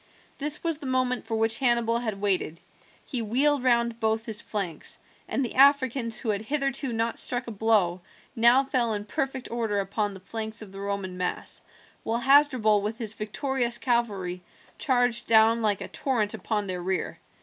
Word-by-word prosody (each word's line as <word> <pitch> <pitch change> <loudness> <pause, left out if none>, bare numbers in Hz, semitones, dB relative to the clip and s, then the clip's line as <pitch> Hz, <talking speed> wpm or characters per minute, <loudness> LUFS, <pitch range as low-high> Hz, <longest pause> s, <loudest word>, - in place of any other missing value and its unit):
This 295 +1 0
was 330 -3 -1
the 285 - -7
moment 255 -2 0
for 225 -1 -1
which 225 +1 +1
Hannibal 235 -3 +2
had 220 -4 -4
waited. 190 -5 0 0.5
He 250 - -2
wheeled 265 +5 +2
round 235 -2 +2
both 220 0 0
his 220 -1 -1
flanks, 190 -7 -4 0.3
and 270 - -1
the - - -6
Africans, 260 -4 +3
who 235 - -4
had 205 -1 0
hitherto 275 +1 -2
not 230 0 -1
struck 245 0 -1
a 235 - -6
blow, 200 -5 +1 0.3
now 240 +3 +5
fell 250 -5 0
in 205 0 -5
perfect 265 +4 -3
order 225 -3 -1
upon 200 +1 -2
the - - -10
flanks 220 +3 -5
of 200 - -13
the 195 - -10
Roman 200 -2 -4
mass, 180 - -4 0.4
while 225 +1 -1
Hasdrubal 255 -6 +4
with 210 +2 -3
his 220 -3 -5
victorious 240 +3 -1
cavalry 200 -8 -1 0.4
charged 245 -3 +1
down 225 +1 +5
like 210 -3 0
a - - -5
torrent 225 -6 -1
upon 210 0 -2
their 185 -2 -4
rear. 185 +1 -2
225 Hz, 175 wpm, -26 LUFS, 205-255 Hz, 0.5 s, now